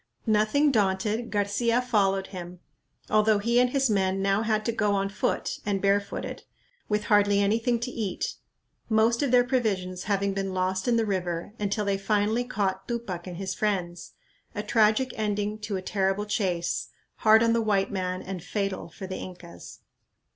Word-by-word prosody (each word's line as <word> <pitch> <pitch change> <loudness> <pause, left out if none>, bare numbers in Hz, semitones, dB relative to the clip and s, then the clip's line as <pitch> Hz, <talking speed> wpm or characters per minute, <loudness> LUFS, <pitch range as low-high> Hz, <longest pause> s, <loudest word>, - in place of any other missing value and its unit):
Nothing 220 +7 +3
daunted, 210 +1 0
Garcia 210 +4 +1
followed 195 -6 +1
him, 180 -1 -7 0.5
although 215 0 +3
he 235 +4 +2
and 250 0 +4
his 270 +1 +2
men 195 -3 +1
now 195 +1 +2
had 215 -1 0
to 230 - +1
go 210 -3 +1
on 195 0 0
foot 200 - -2
and 200 -1 0
barefooted, 200 +1 -1 0.5
with 210 0 +1
hardly 205 -1 +3
anything 225 +4 +1
to 250 +1 -3
eat, 210 -7 -3 0.6
most 225 +1 +3
of 285 - +1
their 245 0 +5
provisions 195 -8 -1
having 200 -1 0
been 195 -1 -3
lost 185 +2 -1
in 240 - +3
the 225 -1 +2
river, 180 -2 -2
until 210 +1 -1
they 200 -1 0
finally 210 +3 +1
caught 195 -5 -2
Tupac 205 -8 -4
and 175 -2 -6
his 190 0 -3
friends; 180 -5 -2 0.4
a 210 - -2
tragic 220 +4 +3
ending 210 0 -1
to 210 -2 -3
a 185 - -6
terrible 195 +1 0
chase, 185 -5 -1 0.3
hard 220 +1 +5
on 230 0 +3
the 230 - +2
white 205 -3 +1
man 185 -1 -3
and 185 -3 -6
fatal 195 -2 -3
for 180 +4 -9
the 185 0 -5
Incas. 175 -2 -10
205 Hz, 170 wpm, -27 LUFS, 190-220 Hz, 0.6 s, their